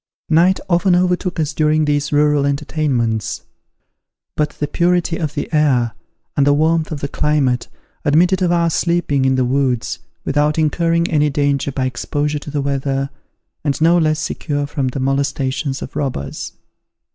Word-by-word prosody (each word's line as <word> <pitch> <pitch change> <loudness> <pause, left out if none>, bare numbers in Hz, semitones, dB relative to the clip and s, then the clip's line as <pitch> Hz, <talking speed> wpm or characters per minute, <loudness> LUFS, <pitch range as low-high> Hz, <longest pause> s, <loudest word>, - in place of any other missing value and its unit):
Night 175 +4 +4
often 180 0 +3
overtook 180 0 0
us 155 0 -1
during 155 0 +2
these 145 0 0
rural 150 -1 +3
entertainments; 140 -6 -1 0.9
but 150 -1 +1
the 150 - -3
purity 175 +1 +1
of 155 -4 -3
the 145 - -2
air 130 -6 +3 0.4
and 140 -1 +3
the 145 - +5
warmth 160 +2 +1
of 145 -3 -4
the 140 - -1
climate, 140 -4 0 0.4
admitted 175 +5 +3
of 180 -2 +2
our 170 -1 +2
sleeping 165 -6 +1
in 130 0 +3
the 130 -1 +1
woods, 130 -2 0 0.3
without 150 +2 +1
incurring 165 +2 +1
any 150 -1 +3
danger 140 -1 0
by 130 0 -1
exposure 145 +4 -2
to 145 - -9
the 145 -1 -2
weather, 135 0 -1 0.5
and 145 -2 -1
no 165 +2 +4
less 155 -2 +2
secure 145 -2 -2
from 140 -2 -2
the 130 +2 -3
molestations 135 0 -1
of - - -9
robbers. 125 - -4
150 Hz, 160 wpm, -18 LUFS, 140-160 Hz, 0.9 s, the